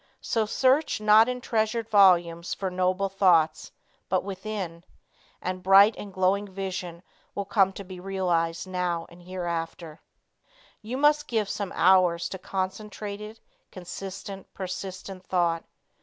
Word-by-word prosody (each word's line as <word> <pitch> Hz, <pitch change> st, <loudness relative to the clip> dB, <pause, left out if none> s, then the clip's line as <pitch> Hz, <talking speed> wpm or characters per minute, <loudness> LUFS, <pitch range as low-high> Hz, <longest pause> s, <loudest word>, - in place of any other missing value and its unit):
So 220 Hz, -2 st, -1 dB
search 265 Hz, +6 st, +2 dB
not 215 Hz, +2 st, +6 dB
in 250 Hz, 0 st, -3 dB
treasured 225 Hz, -1 st, -1 dB
volumes 175 Hz, -5 st, +4 dB
for 190 Hz, -2 st, -3 dB
noble 185 Hz, +2 st, 0 dB
thoughts, 170 Hz, -5 st, +2 dB, 0.4 s
but 185 Hz, 0 st, +1 dB
within, 190 Hz, -3 st, -5 dB, 0.6 s
and 185 Hz, 0 st, -3 dB
bright 195 Hz, +3 st, +7 dB
and 205 Hz, -, -8 dB
glowing 190 Hz, +2 st, +1 dB
vision 185 Hz, -3 st, -5 dB, 0.3 s
will 200 Hz, -, -2 dB
come 195 Hz, -1 st, +3 dB
to 200 Hz, -, -8 dB
be 185 Hz, -1 st, -10 dB
realized 175 Hz, -3 st, -1 dB
now 180 Hz, -2 st, -2 dB
and 170 Hz, +1 st, -16 dB
hereafter. 170 Hz, -3 st, -5 dB, 0.8 s
You 230 Hz, +4 st, -5 dB
must 295 Hz, +1 st, +3 dB
give 220 Hz, -4 st, 0 dB
some 205 Hz, -1 st, -4 dB
hours 180 Hz, -2 st, +4 dB
to 190 Hz, -, -6 dB
concentrated, 205 Hz, +3 st, -5 dB, 0.3 s
consistent, 195 Hz, +2 st, -8 dB
persistent 185 Hz, 0 st, -6 dB
thought. 170 Hz, -3 st, 0 dB
190 Hz, 125 wpm, -26 LUFS, 180-205 Hz, 0.8 s, bright